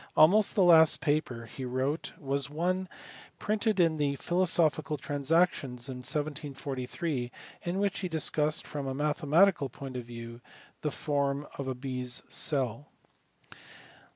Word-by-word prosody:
Almost 200 +7 +6
the 195 - +4
last 160 -3 +6
paper 145 -6 -1
he 130 +3 -8
wrote 130 +5 -2
was 140 -1 -2
one 180 +4 -1 0.5
printed 215 -1 0
in 165 -2 +3
the 145 -2 0
Philosophical 165 -2 +1
Trans 145 +1 -4
actions 140 -8 +2
for 135 - -3
1743 140 0 -3 0.3
in 175 +2 -3
which 200 -1 0
he 185 - -3
discussed 155 -1 0
from 145 -2 -5
a 135 - -3
mathematical 150 +2 +3
point 135 +1 -8
of 125 -1 -4
view 115 0 -9 0.4
the 150 - 0
form 140 -1 -1
of 140 - -3
a 130 - -2
bee 130 0 -4
s 125 -1 -2
cell. 135 -3 +1
145 Hz, 140 wpm, -30 LUFS, 130-165 Hz, 0.5 s, Almost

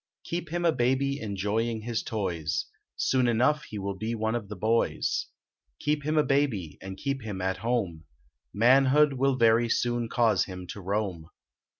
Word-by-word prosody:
Keep 170 -1 -4
him 175 0 -1
a 165 - +5
baby 135 +2 0
enjoying 110 +2 -1
his 115 0 -2
toys 85 -8 -2 0.3
Soon 130 -2 +2
enough 130 +6 +2
he 105 - -7
will 100 0 -3
be 110 +4 -3
one 110 0 -1
of 115 -4 -3
the 105 - -5
boys; 115 +2 0 0.5
Keep 150 0 -1
him 155 +1 0
a 150 - +5
baby 135 - 0
and 95 0 -7
keep 140 +4 -2
him 105 -4 -5
at 95 +1 -1
home 100 -10 -2 0.5
Manhood 135 +5 +5
will 135 0 +2
very 115 -1 +4
soon 120 -1 0
cause 110 -7 +3
him 90 -1 -8
to 100 - -9
roam. 95 -4 -2
115 Hz, 170 wpm, -28 LUFS, 100-135 Hz, 0.5 s, a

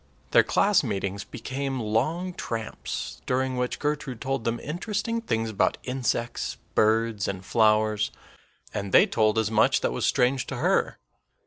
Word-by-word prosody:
Their - - +7
class 200 -4 +3
meetings 100 -3 -2
became 135 0 -4
long 155 +12 -1
tramps, 115 -8 -5
during 130 0 0
which 125 0 -1
Gertrude 145 -5 -2
told 135 -2 -2
them 115 0 0
interesting 210 +8 -2
things 115 - -1
about 105 - +1
insects, 125 -2 -2 0.2
birds, 110 -1 +2
and 95 -1 -4
flowers, 110 -1 +3 0.6
and 100 -2 -4
they - - +8
told 110 -1 +2
as 110 -1 +1
much 110 - +3
that - - 0
was - - 0
strange 125 +1 +2
to - - -4
her. - - +1
115 Hz, 145 wpm, -26 LUFS, 110-135 Hz, 0.6 s, they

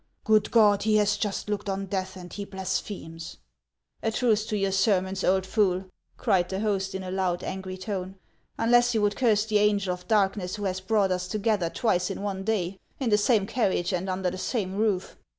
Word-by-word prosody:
"Good 215 -1 +3
God, 210 -3 +5
he 215 0 +2
has 210 0 +3
just 205 -1 -3
looked 210 -1 -2
on 195 0 -2
death, 190 -1 -3
and 180 -1 -10
he 205 - -4
blasphemes! 185 -3 -5 0.2
" - - -60
" - - -47
A 225 - 0
truce 220 -2 +1
to 215 - -1
your 195 -1 0
sermons, 190 -1 +1
old 190 0 +2
fool! 190 -2 0
" - - -44
cried 180 -2 +1
the 190 +1 -3
host, 195 -2 -1
in 190 - -4
a 185 - -5
loud, 185 -2 -1
angry 185 0 -5
tone, 190 -1 -4 0.2
" - - -42
unless 240 +1 +4
you 215 - +2
would 205 0 +2
curse 220 -4 +2
the 215 -2 +2
angel 205 -3 +2
of 180 0 -10
darkness 195 -3 +1
who 205 - -6
has 190 -1 -1
brought 200 -1 +2
us 180 0 -1
together 210 -3 0
twice 180 -2 0
in 195 +1 -5
one 195 -2 -3
day, 190 -3 -1 0.2
in 255 -5 0
the 210 - +5
same 210 -2 +3
carriage 195 -5 0
and 180 +1 -2
under 185 -1 -1
the 185 - -6
same 190 -3 -2
roof. 205 -2 -1
195 Hz, 220 wpm, -27 LUFS, 185-210 Hz, 0.2 s, God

